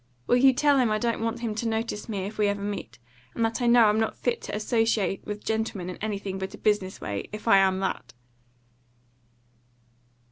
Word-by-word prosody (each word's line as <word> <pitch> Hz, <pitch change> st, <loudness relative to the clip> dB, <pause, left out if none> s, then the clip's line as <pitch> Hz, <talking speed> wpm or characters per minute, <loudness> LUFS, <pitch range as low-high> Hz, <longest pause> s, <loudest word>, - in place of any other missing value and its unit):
Will 245 Hz, -, +3 dB
you 265 Hz, +1 st, +6 dB
tell 285 Hz, +1 st, +3 dB
him 245 Hz, -3 st, +3 dB
I 215 Hz, -, +1 dB
don't 230 Hz, +1 st, -1 dB
want 230 Hz, +1 st, -2 dB
him 230 Hz, -3 st, -2 dB
to 225 Hz, +2 st, -3 dB
notice 225 Hz, -1 st, -3 dB
me 195 Hz, -3 st, -3 dB
if 215 Hz, +2 st, -8 dB
we 210 Hz, -, +3 dB
ever 200 Hz, 0 st, -2 dB
meet, 205 Hz, -1 st, -5 dB, 0.4 s
and 230 Hz, -, +1 dB
that 225 Hz, +3 st, -2 dB
I 240 Hz, -, +1 dB
know 235 Hz, -1 st, +6 dB
I'm 210 Hz, +1 st, +3 dB
not 220 Hz, -, -1 dB
fit 245 Hz, -, -1 dB
to -, -, -5 dB
associate 215 Hz, -3 st, 0 dB
with 210 Hz, 0 st, -6 dB
gentlemen 220 Hz, -5 st, -2 dB
in -, -, -9 dB
anything 200 Hz, -2 st, -4 dB
but 190 Hz, 0 st, -5 dB
a -, -, -14 dB
business 205 Hz, -3 st, 0 dB
way, 100 Hz, -1 st, -5 dB
if 210 Hz, +2 st, -8 dB
I 195 Hz, -, +7 dB
am 190 Hz, -1 st, +2 dB
that?" 190 Hz, -, -3 dB
215 Hz, 210 wpm, -26 LUFS, 200-230 Hz, 0.4 s, I